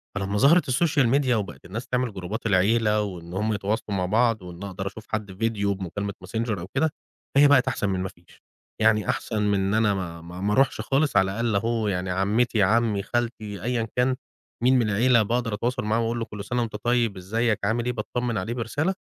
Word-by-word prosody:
فلما 100 +1 -1
ظهرت 150 +6 +5
الsocial 145 0 +3
media 135 -3 -1
وبقت 105 -5 -3
الناس 110 +8 -6
تعمل 125 -3 -1
جروبات 100 +5 -5
العيلة، 105 +2 +3
وإن 90 -4 -6
همَ 105 +3 0
يتواصلوا 100 0 -2
مع 90 - 0
بعض، 115 +2 +2
وإن 90 +1 -9
أقدر 95 0 -5
أشوف 110 +3 -8
حد 105 -2 -3
فيديو 100 -1 0
بمكالمة 100 +2 -4
Messenger 110 +1 -2
أو 85 - -7
كده، 160 +4 +3 0.5
هي 145 +1 +8
بقت 140 -2 +5
أحسن 120 -5 0
من 95 -1 -1
ما 95 +1 -2
فيش. 85 -1 -22 0.4
يعني 105 -3 +3
أحسن 110 -2 -1
من 100 -1 +2
إن 95 +1 0
أنا 110 -1 +3
ما 85 -4 -5
ما 90 +2 -9
ما 105 +1 +1
أروحش 135 +5 +2
خالص 140 +2 +1
على 95 0 +3
الأقل 115 +1 -1
أهو 115 +1 0
يعني 95 -2 -1
عمتي، 105 +4 +2
عمي، 110 0 +2
خالتي، 110 -3 -3
أيًا 120 -1 -1
كان 125 +1 +2 0.5
مين 130 +1 +5
من 115 -3 +1
العيلة، 115 +3 +4
باقدر 115 +1 -1
أتواصل 125 +4 -1
معاه 110 +2 +1
وأقول 115 +1 -1
له 115 - -2
كل 105 -3 -8
سنة 120 +3 -1
وأنت 110 -3 -3
طيب، 120 -4 +1
إزيك، 110 +4 0
عامل 115 +3 0
إيه، 125 - +1
باتطَمن 120 +1 -2
عليه 100 +5 -2
برسالة. 140 - -1
110 Hz, 210 wpm, -25 LUFS, 100-120 Hz, 0.5 s, هي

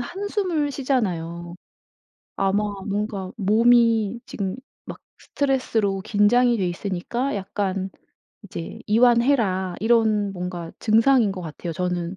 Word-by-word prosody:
한숨을 365 - -2
쉬잖아요. 175 - -2 0.8
아마 195 +2 +1 0.2
뭔가 200 -2 -3
몸이 230 +1 +3
지금 195 0 -4 0.3
막 - - -8 0.2
스트레스로 230 -8 -1
긴장이 225 +4 +3
돼 185 - 0
있으니까 200 +8 -3
약간 195 -1 -3 0.5
이제 170 -4 -7
'이완해라.' 230 -5 +3
이런 220 -3 +2
뭔가 180 -2 -5
증상인 225 0 +3
것 190 - -7
같아요 165 +1 -6
저는. 180 +1 -3
210 Hz, 245 characters per minute, -23 LUFS, 185-240 Hz, 0.8 s, 몸이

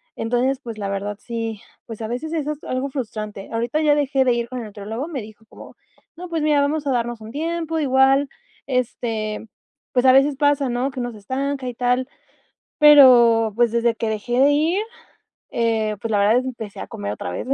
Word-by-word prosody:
Entonces, 245 +4 0
pues, 230 -2 -7
la 205 -2 -4
verdad 200 +1 -3
sí, 225 -2 -5 0.3
pues, 225 -1 -8
a - - -3
veces 250 +7 -4
eso 300 -2 -1
es 295 - -16
algo 255 +2 -2
frustrante, 215 -6 -6
ahorita 235 +6 -1
ya 300 -1 +4
dejé 275 -2 +1
de 250 - +3
ir 235 0 -2
con 255 +1 -6
el 235 - -6
nutriólogo, 215 +6 -6
me 275 -8 -4
dijo 215 +1 -14
como: - - -13 0.4
"No, 355 +1 -9
pues, 325 -2 -2
mira, 300 -2 +3
vamos 290 +1 -1
a - - +2
darnos 240 -2 -1
un 220 - -9
tiempo, 325 +2 -2
igual, 270 0 +3 0.4
este, 225 -4 -2 0.4
pues, 250 0 +1
a 260 - +8
veces 275 +1 +4
pasa, 285 -2 +2
¿no? 245 +3 -1
Que 260 - -7
uno 245 0 -3
se 220 - -12
estanca 265 +5 -3
y 245 - -4
tal". 250 +1 0 0.7
Pero, 245 -7 +7
pues, 240 -1 +3
desde 235 0 +2
que 225 - -2
dejé 230 +3 -2
de 280 +2 +5
ir, 325 +7 +1 0.7
eh, 225 -2 0
pues 230 - -4
la 210 - +2
verdad 210 +4 +4
empecé 230 -5 -7
a - - -7
comer 100 0 -5
otra 95 - -5
vez 90 - -5
245 Hz, 205 wpm, -21 LUFS, 225-280 Hz, 0.7 s, a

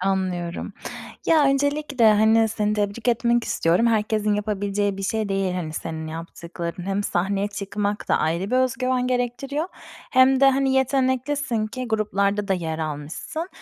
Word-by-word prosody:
Anlıyorum. 185 -2 -2 0.5
Ya, 315 -3 +5
öncelikle, 275 -4 +3
hani, 220 +1 +4
seni 210 -1 -1
tebrik 210 +3 -1
etmek 235 0 +2
istiyorum, 175 +8 +2
herkesin 215 -2 +1
yapabileceği 205 -1 -1
bir 195 - -5
şey 215 +1 -1
değil, 195 -2 0
hani, 165 -4 -4
senin 160 0 -5
yaptıkların. 170 +2 -6
Hem 195 +1 0
sahneye 195 +2 0
çıkmak 200 +1 -3
da - - +3
ayrı 170 +6 -1
bir 255 - +2
özgüven 255 0 +1
gerektiriyor 255 +6 -1 0.4
hem 260 0 +5
de, 275 0 +7
hani, 270 0 +1
yeteneklisin 265 -2 +1
ki 250 +2 -6
gruplarda 205 -1 0
da 190 - +3
yer 160 -3 -3
almışsın. 155 - -5
210 Hz, 145 wpm, -23 LUFS, 195-255 Hz, 0.5 s, de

